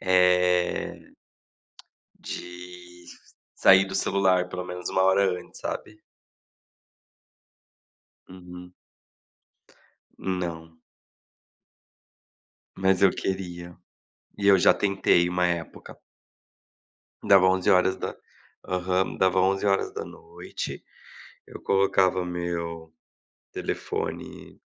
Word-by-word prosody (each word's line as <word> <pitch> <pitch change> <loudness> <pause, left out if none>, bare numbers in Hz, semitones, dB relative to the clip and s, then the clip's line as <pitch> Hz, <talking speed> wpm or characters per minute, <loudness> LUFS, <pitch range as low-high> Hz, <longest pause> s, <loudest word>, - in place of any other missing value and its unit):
eh, 90 -1 +2 1.1
de 90 0 -10 0.5
sair 95 0 +6
do 95 - -6
celular 95 -2 +1
pelo 90 0 -5
menos, 90 0 -6
uma 95 - +1
hora 95 -1 +2
antes, - - -16
sabe? 105 - -6 2.3
Uhum. 90 -1 -12 1.5
Não. 85 -3 -5 2.0
Mas 95 0 +1
eu 95 - +7
queria. 90 -2 -5 0.6
E 100 - -1
eu 100 -1 +7
já - - +6
tentei 95 -3 +2
uma 90 0 +1
época. 85 -1 -5 1.3
Dava 95 -2 +7
11 95 - 0
horas 95 +1 +3
da - - -2 0.6
aham, 90 +1 0
dava 95 0 +3
23hrs, 95 -2 -3 0.6
eu - - -11
colocava 95 -1 +2
meu 85 -2 -5 0.6
telefone - - -5
90 Hz, 80 wpm, -25 LUFS, 90-95 Hz, 2.3 s, eu